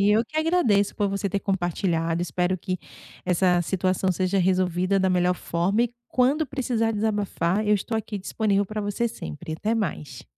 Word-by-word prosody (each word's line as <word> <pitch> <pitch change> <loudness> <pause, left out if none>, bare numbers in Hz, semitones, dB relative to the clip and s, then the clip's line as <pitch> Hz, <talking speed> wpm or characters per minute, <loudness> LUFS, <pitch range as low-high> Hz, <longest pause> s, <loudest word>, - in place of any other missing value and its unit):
Eu 210 +3 +4
que 310 - -10
agradeço 295 - +2
por 205 -2 +1
você 200 +1 -1
ter 200 +1 -1
compartilhado. 175 -3 0
Espero 180 +3 0
que 185 +1 -3 0.5
essa 180 0 +3
situação 185 +1 0
seja 185 +2 0
resolvida 185 +1 +2
da 190 0 +2
melhor 180 0 +2
forma 180 +7 0
e 240 0 -2
quando 275 +5 +2
precisar 240 -5 0
desabafar, 205 -2 0
eu 210 - +4
estou 225 +3 -2
aqui 215 -1 -4
disponível 200 +1 0
para 215 +2 -4
você 205 +3 -1
sempre 80 - -7
e - - -2
até 220 +2 0
mais. 150 - -3
195 Hz, 175 wpm, -25 LUFS, 180-220 Hz, 0.5 s, Eu